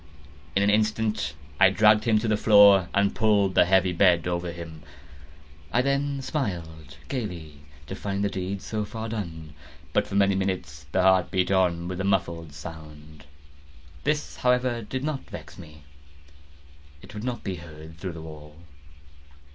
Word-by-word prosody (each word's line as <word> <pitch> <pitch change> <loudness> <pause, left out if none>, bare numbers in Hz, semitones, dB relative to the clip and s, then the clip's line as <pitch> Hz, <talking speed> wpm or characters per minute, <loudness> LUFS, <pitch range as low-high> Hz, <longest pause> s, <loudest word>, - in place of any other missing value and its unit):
In 100 - +3
an 100 - +3
instant 110 +1 0 0.2
I 95 -1 +7
dragged 105 +2 +4
him 110 -2 +3
to 110 +2 -1
the 110 - +2
floor, 100 -3 +6
and 100 0 +2
pulled 105 -4 +2
the - - +5
heavy 95 0 +3
bed 85 -1 +3
over 85 0 -2
him. 85 -2 -9 0.9
I 125 - +2
then 140 0 -1
smiled 80 - -4
gaily, 90 - -5 0.3
to - - -7
find 100 0 -3
the 100 - +1
deed 95 +1 -4
so 110 -1 -3
far 110 +2 -6
done. 80 -8 -6 0.4
But, 105 - +1
for 100 - -6
many 100 -1 +4
minutes, 90 -8 -3
the - - +2
heart 95 -1 +4
beat 95 0 0
on 90 -3 +1
with 90 +1 -4
a - - -2
muffled 85 -5 -1
sound. 75 -1 -11 0.8
This, 150 0 -1
however, 125 -1 +1
did 130 +5 -5
not 150 -2 -4
vex 75 +2 -10
me; 75 -4 -13 1.2
it - - -13
would 105 0 -7
not 125 -1 -4
be 95 -3 -4
heard 80 -1 -12
through 95 -1 -5
the 80 -1 -9
wall. 75 -1 -11
95 Hz, 165 wpm, -26 LUFS, 80-105 Hz, 1.2 s, I